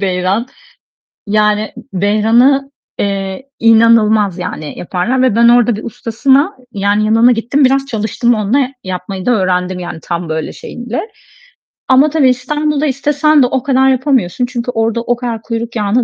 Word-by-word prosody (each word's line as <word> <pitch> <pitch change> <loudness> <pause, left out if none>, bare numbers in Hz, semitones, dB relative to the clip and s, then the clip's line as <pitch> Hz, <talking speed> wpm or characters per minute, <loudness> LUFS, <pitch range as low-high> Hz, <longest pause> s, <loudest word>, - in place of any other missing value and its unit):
beyran 190 +4 -1 0.8
Yani, 210 0 +1 0.2
beyran'ı, 225 +8 +2 0.3
eee, 195 +5 -3
inanılmaz, 220 -4 +4
yani, 155 -4 -6
yaparlar 190 +9 -1
ve 255 -5 +2
ben 235 0 +5
orada 240 -2 +4
bir 215 - -8
ustasına 265 - 0 0.2
Yani 205 +1 0
yanına 225 +3 +4
gittim 245 +5 0
biraz 270 +1 +2
çalıştım 235 0 0
onunla. 240 +5 0
Yapmayı 185 +1 -6
da - - +3
öğrendim. 185 -3 0
Yani 175 -2 -6
tam 170 -1 -4
böyle 160 0 -3
şeyinde 245 - -7 0.8
ama 265 +3 +5
tabii 290 -3 +3
İstanbul'da 300 +3 -1
istesen 290 +2 +2
de - - +3
o 255 0 -2
kadar 265 -1 +2
yapamıyorsun 255 - 0
çünkü 245 0 -4
orada 225 0 -1
o 240 +1 0
kadar 235 -2 -5
kuyruk 230 +1 -5
yağını 215 +3 +1
230 Hz, 145 wpm, -14 LUFS, 205-260 Hz, 0.8 s, ben